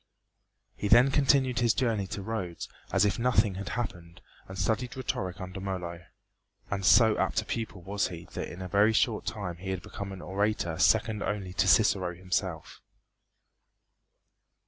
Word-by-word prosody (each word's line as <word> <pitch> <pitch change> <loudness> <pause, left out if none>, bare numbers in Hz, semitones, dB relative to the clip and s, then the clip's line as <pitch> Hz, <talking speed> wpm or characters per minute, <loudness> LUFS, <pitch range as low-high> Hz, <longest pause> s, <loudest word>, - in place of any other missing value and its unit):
He 105 - -3
then 120 +6 +6
continued 135 -3 +3
his 120 -2 +3
journey 115 -7 0
to 100 - -5
Rhodes 95 -6 -4 0.2
as - - +3
if 105 - 0
nothing 115 -4 +3
had 100 - -5
happened 85 -8 -5 0.3
and 95 - -9
studied 120 +6 -1
rhetoric 95 -7 -3
under 95 +1 -6
Molo; 90 -3 -5 0.7
and 100 -1 -2
so 110 +2 +6
apt - - +1
a - - -19
pupil 110 -5 -4
was 100 +2 -1
he 85 -1 -9
that - - -4
in 90 +2 -7
a - - -5
very 100 +4 +3
short 110 -1 +1
time 90 -5 -4
he 95 +2 -3
became 100 +2 -7
an 95 -3 -8
orator 95 -2 -1
second 105 +4 +3
only 100 -3 -3
to 95 +1 +1
Cicero 95 -4 +3
himself. 90 -2 -3
100 Hz, 160 wpm, -29 LUFS, 90-110 Hz, 0.7 s, then